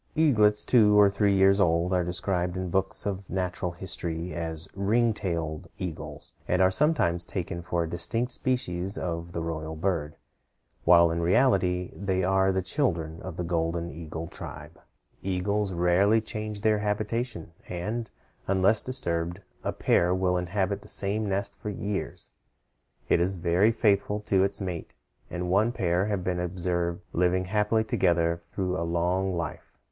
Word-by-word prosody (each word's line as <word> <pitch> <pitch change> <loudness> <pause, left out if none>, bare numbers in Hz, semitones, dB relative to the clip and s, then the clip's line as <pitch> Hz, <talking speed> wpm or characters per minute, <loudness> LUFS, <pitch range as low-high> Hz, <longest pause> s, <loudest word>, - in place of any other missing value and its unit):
Eaglets 110 -10 +4
two 105 -4 +5
or 100 -1 +6
three 100 0 +2
years 95 +1 +5
old 85 0 +2
are 90 -1 +2
described 90 0 -1
in 95 -1 -3
books 95 +1 +1
of 100 -1 -4
natural 90 -1 -2
history 85 -1 -3
as 80 -1 -2
ring 110 +4 +2
tailed 85 -6 -3
eagles, 90 -4 -6
and 90 - +1
are 95 0 +5
sometimes 95 - +2
taken 85 -1 -4
for 85 0 -1
a - - -3
distinct 95 +9 -1
species 100 -8 -2
of 85 -1 -4
the 85 -1 -3
royal 80 -1 -4
bird, 80 -3 -2 0.7
while 85 -1 +6
in 85 +1 -1
reality 90 -2 +2
they 95 -2 -1
are 95 +1 +3
the 95 0 -1
children 85 - -1
of 85 - -7
the 90 - -2
golden 85 0 -1
eagle 80 0 -6
tribe. - - -9 0.4
Eagles 95 +2 -1
rarely 90 +5 +3
change 110 -1 -5
their 110 -1 +3
habitation, 105 -2 -2 0.2
and, 110 +6 -3 0.4
unless 95 +3 +3
disturbed, 85 -8 -2 0.2
a - - -1
pair 90 +1 +2
will 90 -1 +1
inhabit 95 +2 -1
the - - -14
same 105 +1 +1
nest 100 +1 -2
for 105 - -4
years. 100 0 -4 0.8
It - - +3
is 90 +3 +1
very 90 +4 +3
faithful 105 -2 +1
to 95 -2 +2
its 100 - +1
mate, 90 -4 -5 0.3
and 90 0 -3
one 105 +5 +3
pair 95 -4 0
have 100 -3 -1
been 90 -1 -1
observed 85 -1 -1
living 90 +1 +2
happily 105 +3 +1
together 85 -5 +1
through 90 +1 -3
a 95 - -2
long 90 +3 0
life. 85 - -5
95 Hz, 155 wpm, -27 LUFS, 85-100 Hz, 0.8 s, or